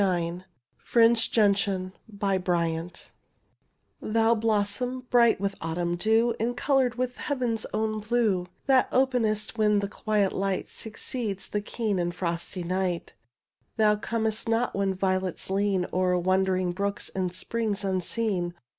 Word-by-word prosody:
'^ 175 -2 0 0.3
FRINGED 230 -1 +3
GENTIAN 200 -3 +2 0.2
Tliou 175 -4 -1 1.3
blossom, 220 +4 0
bright 235 -4 +5
with 200 0 -1
autumn 170 +1 -1
dew, 225 +5 +2
And 240 +2 -1
coloured 260 -3 +2
with 250 0 -2
heaven's 245 -6 -1
own 215 0 -1
blue, 215 -5 +1 0.2
That 265 -2 +4
openest 230 -4 +1
when 210 -1 +4
the 200 0 0
quiet 210 -1 0
light 195 -1 -1
Succeeds 220 -2 -5
the 205 - -1
keen 210 -2 -2
and 175 0 -1
frosty 175 +1 -3
night: 180 0 -2 0.6
Thou 215 -1 +4
comest 220 +1 -1
not 230 +2 +1
when 195 -1 0
violets 185 -1 -1
lean 195 -2 +1
O'er 180 0 +2
wandering 185 0 +1
brooks 200 +2 -3
and 185 -2 -1
springs 210 +2 -2
unseen. 185 -1 -1
200 Hz, 125 wpm, -27 LUFS, 185-225 Hz, 1.3 s, bright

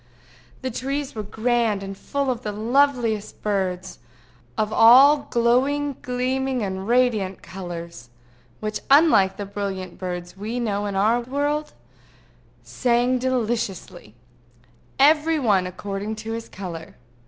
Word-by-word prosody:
The 260 - -2
trees 275 +4 -3
were 215 - -4
grand, 220 -1 0
and 195 0 -6
full 280 +6 -2
of 245 -1 -4
the 210 - -4
loveliest 235 -1 0
birds, 190 -3 -2 0.6
of 215 0 -1
all 270 +6 +7
glowing 270 +5 +1
gleaming 255 0 -1
and 190 0 -4
radiant 230 -6 +1
colors, 170 -8 -8 0.5
which, 215 0 -3
unlike 275 - +5
the 205 - -4
brilliant 195 -2 -5
birds 180 -1 -5
we 220 +5 -4
know 205 -3 -1
in 200 - -4
our 215 +5 +3
world, 290 +4 -2 0.9
sang 245 +1 +1
deliciously, 235 - -3 0.8
every 305 +3 +4
one 205 -9 +2
according 200 +3 -5
to 220 +1 -7
his 230 0 -5
color. 175 -4 -8
225 Hz, 120 wpm, -23 LUFS, 195-255 Hz, 0.9 s, all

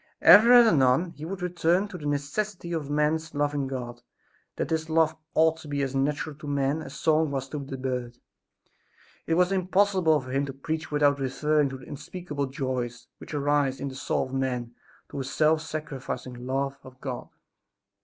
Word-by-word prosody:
Ever 210 +8 +9
and 240 -1 +9
anon 140 - +3
he 155 -1 -9
would 185 +1 -5
return 180 +2 +1
to 185 - -7
the 150 - -5
necessity 170 +6 -2
of 155 -4 -3
man's 155 +2 0
loving 145 -1 0
God; 120 -2 -6 0.5
that - - -2
this 160 -1 -1
love 160 0 +3 0.2
ought 160 0 +4
to 160 -1 -12
be 145 -1 -1
as 135 -1 -2
natural 145 +2 -1
to 150 - -9
men 140 +2 0
as - - -9
song 160 -1 +2
was 135 -1 -3
to 150 - -4
the 135 -1 -6
bird. 125 -2 -3 1.1
It 165 - +2
was 180 +2 +3
impossible 185 -3 +3
for 130 -1 -8
him 140 +2 0
to 135 - -5
preach 155 +4 -4
without 145 -1 +3
referring 145 +2 +1
to 135 - -6
the 130 - -13
unspeakable 145 -1 -5
joys 125 -2 -4
which - - -8
arise 145 -2 +1
in 140 - -3
the - - -9
soul - - -1
of 130 - -10
man 125 -3 -2 0.3
through - - -6
a - - -2
self 155 +4 +2
sacrificing 130 -5 -6
love 135 +1 -1
of 130 0 -14
God. 130 -3 -6
145 Hz, 185 wpm, -27 LUFS, 135-160 Hz, 1.1 s, Ever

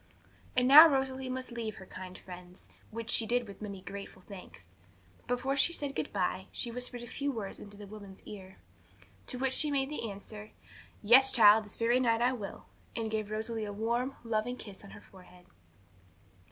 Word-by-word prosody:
And 250 0 +4
now 300 +5 +11
Rosalie 265 -2 -1
must 255 0 -4
leave 230 -2 -4
her 190 - -11
kind 185 0 -9
friends, 180 0 -12 0.2
which 230 +1 -5
she 225 - +3
did 240 0 0
with 200 0 -11
many 200 -3 -6
grateful 195 -1 -9
thanks. 180 - -11 0.6
But 245 - +2
before 270 +2 -1
she 310 +5 +3
said 285 -4 -4
goodbye, 190 -1 -2
she 240 - -4
whispered 245 0 -5
a - - -6
few 280 +4 -3
words 215 -6 -5
in 205 - -10
the 205 0 -10
woman's 200 -2 -11
ear. 190 -2 -10 0.7
To 250 - -4
which 260 0 0
she 300 +3 +4
made 280 0 0
answer, 210 -3 -7 0.5
'Yes, 260 +5 +7
child; 215 -2 +7
this 210 - -8
very 235 +2 +2
night 230 -3 +2
I 245 +2 +2
will;' 210 -6 -7 0.3
and 225 -1 -3
gave 215 -1 -2
Rosalie 220 +1 -3
a 205 - -5
warm, 235 +6 -1
loving 230 +2 -1
kiss 205 -5 -10
on 200 - -12
her - - -12
forehead. 180 -1 -17
225 Hz, 185 wpm, -31 LUFS, 200-250 Hz, 0.7 s, now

